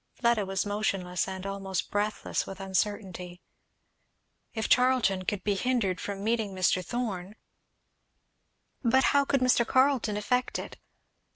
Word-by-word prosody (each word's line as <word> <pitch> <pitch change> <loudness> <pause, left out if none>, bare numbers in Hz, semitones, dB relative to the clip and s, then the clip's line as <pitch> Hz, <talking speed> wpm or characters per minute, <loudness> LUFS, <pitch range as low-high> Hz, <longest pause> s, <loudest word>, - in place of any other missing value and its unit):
Fleda 235 -5 +1
was 195 +1 -1
motionless 195 -4 -1
and 190 0 -6
almost 195 -1 -3
breathless 210 +1 -1
with 195 0 -8
uncertainty. 190 -2 -2 1.2
If 220 -1 -1
Charlton 250 -7 +3
could 195 0 -2
be 205 - +1
hindered 200 -5 0
from 200 -1 -5
meeting 220 -3 0
Mr. 185 0 +2
Thorn 205 -3 -4 1.5
But 265 +2 +4
how, 280 0 +4
could 275 -1 +1
Mr. 250 -2 +4
Carleton 255 -4 +2
effect 250 +4 0
it? - - -7
205 Hz, 125 wpm, -28 LUFS, 190-235 Hz, 1.5 s, But